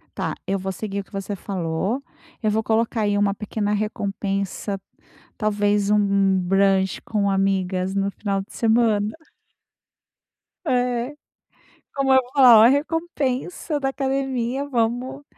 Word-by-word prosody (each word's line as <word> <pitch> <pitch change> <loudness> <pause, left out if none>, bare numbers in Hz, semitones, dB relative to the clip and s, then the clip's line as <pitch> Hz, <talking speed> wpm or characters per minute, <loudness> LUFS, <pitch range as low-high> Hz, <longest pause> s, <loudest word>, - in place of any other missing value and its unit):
Tá, - - -2
eu 195 - 0
vou 190 0 -3
seguir 200 +1 -4
o - - -11
que - - -28
você 195 0 -4
falou. 190 +5 -2 0.4
Eu 215 - +1
vou 220 +1 0
colocar 225 +1 0
aí 205 -1 +1
uma 205 -1 +2
pequena 210 0 -2
recompensa, 200 -1 -2 0.6
talvez 205 -2 +1
um 200 -2 +3
brunch 190 +1 +2
com 205 -2 0
amigas 190 -1 0
no 200 0 0
final 200 -1 -2
de 195 - -13
semana. 220 -2 +2 1.6
É. 245 +1 0 0.8
Como 275 -1 +1
eu 260 - +7
vou 250 - -16
falar: 250 -6 +8
"Olha, 225 - +8
recompensa 295 0 -1
da 270 -1 0
academia. 270 -1 -2
Vamos 250 +2 -1
210 Hz, 135 wpm, -23 LUFS, 195-250 Hz, 1.6 s, falar